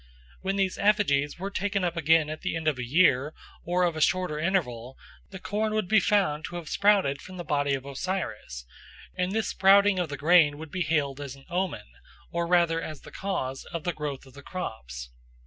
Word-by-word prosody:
When 195 +1 -1
these 195 -2 0
effigies 195 -9 +2
were 195 +3 -5
taken 200 0 -1
up 175 -1 -1
again 160 -1 +3
at 155 - -6
the 180 - -2
end 160 -1 -3
of 145 -4 +1
a - - -2
year 145 +1 +3 0.3
or 180 +1 +1
of 170 -2 +1
a 155 - -3
shorter 180 -2 +1
interval, 135 -9 -1 0.3
the 190 - -8
corn 215 +3 -2
would 215 -4 0
be 220 +3 +5
found 185 -9 +1
to 175 - -7
have 170 -3 -6
sprouted 200 -9 +2
from 185 0 -10
the 175 - -5
body 145 -3 +1
of 135 0 -7
Osiris, 140 - -4 0.5
and 180 0 -1
this 220 +1 -1
sprouting 195 0 +5
of 175 -3 -1
the 145 - -5
grain 155 -1 +5
would 155 -1 -9
be 185 - -3
hailed 145 -4 0
as 140 -2 -6
an 135 - -17
omen, 185 +1 -2 0.5
or 170 0 -1
rather 170 -2 +3
as 155 -3 -7
the - - -13
cause, 135 -9 -3
of 170 -3 -6
the 175 - -1
growth 145 -3 -5
of 130 - -17
the 140 - -12
crops. 60 - -6
165 Hz, 210 wpm, -27 LUFS, 145-185 Hz, 0.5 s, be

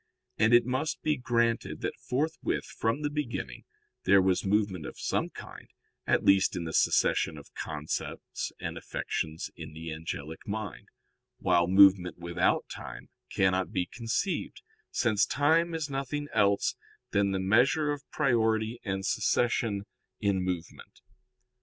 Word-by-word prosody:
And 110 +1 +4
it 120 -1 +6
must 130 +5 -2
be 155 -1 +2
granted 120 -3 0
that - - -2 0.2
forthwith 150 +6 -1
from 115 +7 -2
the 145 - +1
beginning, 120 - -4 0.4
there 100 +1 +6
was 95 -1 +2
movement 100 -4 0
of - - -9
some - - -1
kind, - - -11 0.4
at - - +3
least 95 0 +4
in 90 - -2
the 80 -1 -5
succession 80 - +2
of 70 - -13
concepts 75 -1 -4
and - - -4
affections 80 +1 -4
in 75 -2 -9
the 80 +1 -6
angelic 80 0 -6
mind: 105 -2 -5 0.5
while 85 -1 +3
movement 95 -1 +6
without 85 +1 +1
time - - -9 0.2
cannot 95 -1 +1
be 90 - 0
conceived, 120 - -3 0.3
since 110 -4 +2
time 165 +4 +2
is 160 -2 -2
nothing 140 +1 -3
else 100 -1 +2 0.4
than 100 0 +2
"the 95 -1 -1
measure 125 +10 +3
of 145 -1 -3
priority 115 -4 +1
and 95 -2 -2
succession 110 -1 +1 0.3
in 100 -2 +1
movement." 90 -2 -5
100 Hz, 140 wpm, -29 LUFS, 90-125 Hz, 0.5 s, it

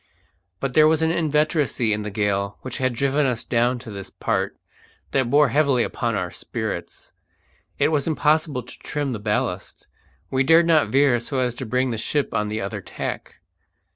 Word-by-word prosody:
But 135 -2 -2
there 155 +2 +6
was 160 0 +2
an 160 - +2
inveteracy 150 -7 +1
in 105 - -2
the 105 - -4
gale 100 -1 -1
which 130 - -5
had 130 -2 0
driven 140 +3 +1
us 120 -3 -1
down 120 +1 +1
to 120 -2 -9
this 100 -1 -7
part - - -2 0.5
that 130 -3 +1
bore 145 +1 +5
heavily 140 -5 +3
upon 120 -4 -2
our 90 -3 -2
spirits. 110 -6 -6 0.6
It - - +3
was 150 -2 0
impossible 155 -4 +1
to 125 - -13
trim 145 -3 -3
the 110 - -4
ballast. 105 -3 -3 0.4
We 130 - +1
dared 165 +4 +5
not 160 -3 +4
veer 135 -3 +4
so 130 +4 -4
as 125 -2 +1
to 125 0 -6
bring 125 +2 0
the 115 - -3
ship 145 +5 -1
on 105 -2 0
the 110 +1 -3
other 100 - -4
tack. - - -6
130 Hz, 185 wpm, -23 LUFS, 110-150 Hz, 0.6 s, there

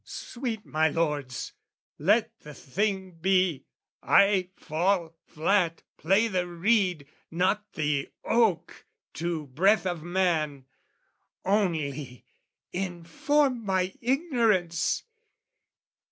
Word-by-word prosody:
Sweet 235 -4 -5
my 160 +1 +2
lords, 145 -5 -2 0.5
let 210 +9 +3
the 150 -1 -11
thing 190 +6 -2
be! 185 -5 +2 0.3
I 195 -2 +4
fall 170 +1 -1
flat, 165 +1 +1
Play 195 +7 +3
the 185 -4 -1
reed, 180 -3 +1 0.2
not 185 +5 0
the 145 -2 -1
oak, 210 -8 +1 0.3
to 165 -2 -3
breath 190 +11 +2
of 175 -3 -2
man. 160 -6 0 0.8
Only, 155 - -1 0.5
inform 195 - 0
my 190 -2 0
ignorance! 230 - +1
180 Hz, 90 wpm, -27 LUFS, 160-205 Hz, 0.8 s, I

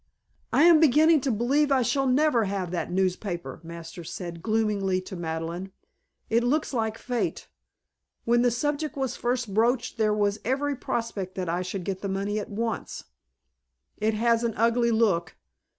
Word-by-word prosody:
"I 290 - +4
am 335 -2 +7
beginning 315 +1 +5
to 265 - 0
believe 275 +7 +2
I 265 -2 +4 0.2
never 260 -2 +3
shall 195 - -2
have 180 -3 -3
that 175 -1 -3
newspaper," 185 -1 -2
Masters 170 0 -8
said 170 -2 -6
gloomily 210 -3 +1
to 185 +1 -8
Madeleine. 170 +2 -4 0.6
"It 230 +1 +2
looks 290 +4 0
like 220 -2 -1
Fate. 245 -1 -3 0.8
When 235 +1 +3
the 245 - +4
subject 295 +5 -2
was 265 -2 -1
first 240 -4 -2
broached 235 +2 +1
there 215 -1 +3
was 205 0 +1
every 280 +4 0
prospect 230 -7 -4
that 185 -3 -3
I 175 +2 0
should 185 +1 -4
get 190 +1 -4
the 200 - -3
money 200 +2 -1
at 210 - -6
once. 225 +2 -3 0.9
It 215 0 0
has 230 +1 +2
an 230 -2 -1
ugly 235 +2 +3
look. 205 -8 +1
220 Hz, 165 wpm, -26 LUFS, 190-245 Hz, 0.9 s, am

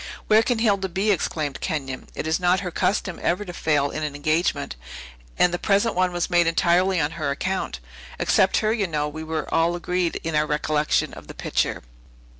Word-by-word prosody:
"Where 215 +1 +5
can 240 +1 0
Hilda 200 -4 +1
be?" 195 +4 +1
exclaimed 155 -6 -2
Kenyon. 135 -4 -4
"It - - -4
is 160 +2 +1
not 180 +1 +2
her 180 -2 -4
custom 190 0 -1
ever 185 +5 0
to 175 - -7
fail 145 -4 +1
in 155 - -4
an 150 -2 -3
engagement; 155 0 0 0.6
and 180 - +4
the 175 - -1
present 205 +4 +2
one 185 0 +1
was 175 -1 -1
made 175 -2 +3
entirely 175 +2 +3
on 145 0 0
her 145 - 0
account. 185 - -2 0.4
Except 190 - +3
herself, 220 +1 +1
you 200 - +1
know, 150 -3 -1
we 155 +2 -6
were 160 -1 -3
all 165 +1 +2
agreed 175 0 -1
in 165 - -3
our 150 0 +2
recollection 150 0 0
of - - -11
the - - -10
picture." - - -1
170 Hz, 200 wpm, -24 LUFS, 155-190 Hz, 0.6 s, Where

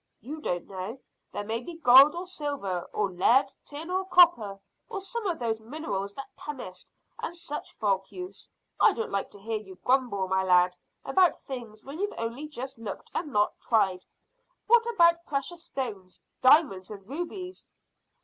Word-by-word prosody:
"You 300 +7 -7
don't 175 - -2
know. 195 +6 -6 0.3
There 205 - -4
may 220 +2 -2
be 335 +6 -8
gold 275 +1 +8
or 350 +2 -4
silver 285 - -4
or 205 -2 0
lead, 230 +9 +3
tin 310 +4 -7
or 375 +1 +1
copper, 340 - +5 0.3
or 395 - -3
some 420 +3 -4
of 345 -3 -1
those 225 -2 -1
minerals 220 -5 -4
that 275 - -9
chemists 245 -11 -8 0.3
and 345 - -4
such 315 -3 -6
folk 195 -2 0
use. 365 0 -9 0.3
I - - +6
don't 455 - -4
like 200 - -1
to 205 - -12
hear 220 +2 -2
you 190 -3 -12
grumble, 245 -7 +2
my 190 0 +2
lad, 180 -1 +4 0.3
about 370 -2 +3
things 235 -5 -8
when 280 +5 -8
you've 410 +1 -2
only 230 +6 -3
just 265 -3 -7
looked 210 -4 -7
and 295 - -3
not 210 -2 +2
tried. 190 -5 +2 0.6
What 470 +1 +5
about 340 -7 +4
precious 330 +5 -3
stones 200 -9 -5 0.2
diamonds 255 - +5
and 200 -2 -10
rubies?" 355 - -6
255 Hz, 170 wpm, -28 LUFS, 200-335 Hz, 0.6 s, gold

